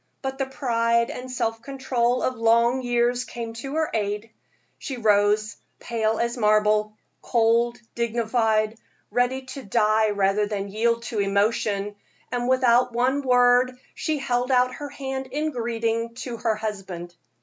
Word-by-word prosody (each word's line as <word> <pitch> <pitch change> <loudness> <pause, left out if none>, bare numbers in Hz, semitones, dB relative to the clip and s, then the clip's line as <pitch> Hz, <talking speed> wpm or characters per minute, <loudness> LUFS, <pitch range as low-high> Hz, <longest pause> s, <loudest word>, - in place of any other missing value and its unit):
But 265 0 -4
the 270 - 0
pride 235 -3 +1
and 255 +1 -7
self 225 -3 -2
control 255 -3 -1
of 255 - +1
long 235 +2 +3
years 245 0 +1
came 230 -2 -6
to 275 +3 -5
her 315 -1 0
aid; 210 +1 -2 0.5
she 265 - -5
rose, 210 -1 +2 0.2
pale 225 -2 -1
as 235 +1 -1
marble, 215 0 +2 0.2
cold, 235 +1 +2
dignified, 225 -2 0 0.3
ready 245 +3 +1
to 260 +1 -8
die 215 0 +2
rather 205 0 +1
than 200 -1 -3
yield 230 +2 +1
to 230 -2 -3
emotion; 200 0 0 0.4
and 245 0 -1
without 250 -1 +4
one 255 +4 +1
word, 250 -1 +4 0.2
she 310 -1 -2
held 250 -2 -1
out 250 0 +3
her 290 -1 -7
hand 265 -1 -5
in 300 +4 -2
greeting 230 -1 -2
to 245 -1 -6
her 225 -1 0
husband. 195 -5 -6
235 Hz, 145 wpm, -24 LUFS, 215-250 Hz, 0.5 s, without